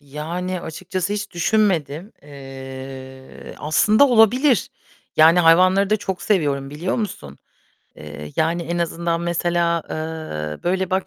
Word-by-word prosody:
Yani 170 +6 -5
açıkçası 185 +4 -4
hiç 205 0 -4
düşünmedim. 175 -2 0
Eee, 135 -1 -10
aslında 215 - +3
olabilir. 245 +2 +4 0.5
Yani 165 +3 +6
hayvanları 185 +4 +4
da 215 - +4
çok 190 -3 -5
seviyorum, 145 -9 0
biliyor 165 +6 -3
musun? 75 - -5 0.6
Eee, 75 0 -9
yani, 165 +2 0
en 170 +1 -3
azından 170 0 -1
mesela, 170 -1 0
eee, 155 - -5
böyle, 185 +1 0
bak, 190 0 0
170 Hz, 120 wpm, -21 LUFS, 145-190 Hz, 0.6 s, Yani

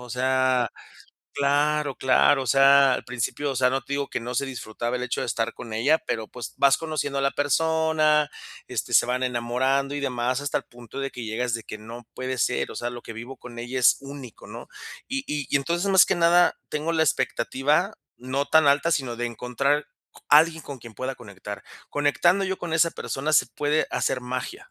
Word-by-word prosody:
o 125 -1 -11
sea 130 0 +1 0.6
claro, 145 0 +1
claro. 135 +2 +3
O - - -6
sea, 135 +1 +6
al - - -4
principio, 125 +3 -2
o 130 - -5
sea, 125 0 +3
no 135 0 -1
te 140 - -8
digo 140 0 -1
que - - -3
no 120 +2 -6
se 135 - +1
disfrutaba 120 -1 -4
el 125 - -5
hecho 120 - -2
de - - -2
estar 115 0 -2
con 115 -2 -9
ella, 140 +9 +3
pero 110 -1 -4
pues 125 +1 -8
vas 140 -1 +5
conociendo 155 -3 -3
a - - -2
la 140 - +2
persona, 155 0 +2 0.4
este, - - -4
se - - +6
van 125 +1 -1
enamorando 130 +3 0
y 145 - -3
demás, 125 -1 -1
hasta 145 0 -1
el - - -11
punto 120 +2 -12
de 135 0 -2
que 120 - -7
llegas 115 +2 -2
de 115 - -3
que 110 - -8
"no 115 +2 -10
puede 130 0 -4
ser, 120 - 0
o - - -11
sea, 120 - -3
lo 120 0 -8
que 115 - -8
vivo 120 +4 -8
con 120 -1 -11
ella 120 +2 -4
es 120 -4 +5
único", 135 -4 -10
¿no? - - -9 0.4
Y 270 +1 -2
y 145 -2 -3
y - - +2
entonces 170 +7 -1
más 190 -2 +7
que - - 0
nada, 175 +1 +4
tengo 150 +2 -2
la 160 - +2
expectativa 145 - 0 0.2
no 130 +3 -2
tan 160 0 +4
alta, 140 +3 +3
sino 130 -7 0
de 120 +1 -2
encontrar 125 +5 -1 0.3
c - - -17
alguien 160 +2 +5
con 140 -2 -8
quien 115 -1 -12
pueda 130 +3 -4
conectar. 105 -3 -9 0.3
Conectando 170 +7 +2
yo 190 0 -3
con 170 -2 -5
esa 165 +1 +3
persona, 150 0 -3
se 130 -4 +5
puede 150 +5 0
hacer 130 - -1
magia. 130 - -6
135 Hz, 215 wpm, -25 LUFS, 120-150 Hz, 0.6 s, más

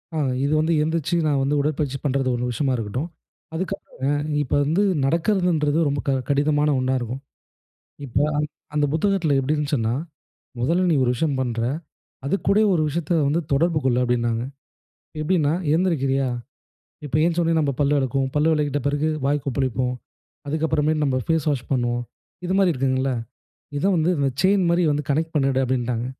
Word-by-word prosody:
ஆ. - - -1 0.3
இது 140 +2 +1
வந்து 160 +2 +2
எந்திருச்சு, 160 +1 -1
நான் 145 -3 +2
வந்து 140 +2 +1
உடற்பயிற்சி 145 -2 -1
பண்றது 135 -1 +1
ஒண்ணு 125 0 -1
விஷயமா 130 +3 0
இருக்கட்டும். 120 - -3 0.5
அதுக்குப் 190 +3 -3 0.3
ஆ, - - +2 0.3
இப்ப 140 - -4
வந்து 165 +8 +1 0.2
நடக்கறதுன்றது 165 -1 +1
ரொம்ப 140 0 -1
க - - +3 0.2
கடினமான 145 +1 +2
ஒண்ணா 130 0 0
இருக்கும். 120 +2 -5 0.9
இப்ப, 125 -3 -2 0.6
அந்த 150 - +2
புத்தகத்துல 170 -2 +1
எப்படியிருந்துச்சுன்னா, 140 -4 0 0.7
"முதல்ல 170 +9 +2
நீ - - +4
ஒரு 120 - +2
விஷயம் 145 +2 0
பண்ற. 120 -3 -2 0.7
அதுக்கூட 195 +5 +1 0.2
ஒரு 160 - +2
விஷயத்த 165 +2 -2 0.2
வந்து 155 +4 +1
தொடர்பு 160 +3 +2
கொள்" 125 -2 +2
அப்படின்னாங்க. 120 -2 0 0.8
எப்படின்னா, 155 -2 +2 0.2
எந்திரிக்கிறியா, 135 -7 +1 0.8
இப்ப 145 - -2
ஏந்திரிச்சோன்னா 165 -4 +1
பல்லு 145 +1 +3
விளக்குவோம். 135 0 0
பல்லு 150 +2 +3
விளக்கிட்ட 145 -2 0
பிறகு 145 +2 +1 0.2
வாய் 145 0 +1
கொப்பளிப்போம். 130 -2 -1 0.5
அதுக்கப்புறமே 155 0 +1
நம்ம 135 -3 +1
ஃபேஸ் 160 -2 +1
வாஷ் 135 -4 -3
பண்ணுவோம். 120 -2 0 0.4
இது 180 - -1
மாதிரி 190 -3 +4
இருக்குங்கள்ல? 130 0 0 0.7
இதை 175 - 0
வந்து 165 +2 +2
அந்த 140 -1 +2
செயின் 190 0 +3
மாதிரி 170 +1 +3
வந்து 145 +1 -1
கனெக்ட் 160 +3 0
பண்ணிடு 135 -2 +2
அப்படின்னாங்க. 125 -2 -1
145 Hz, 150 wpm, -23 LUFS, 130-160 Hz, 0.9 s, நீ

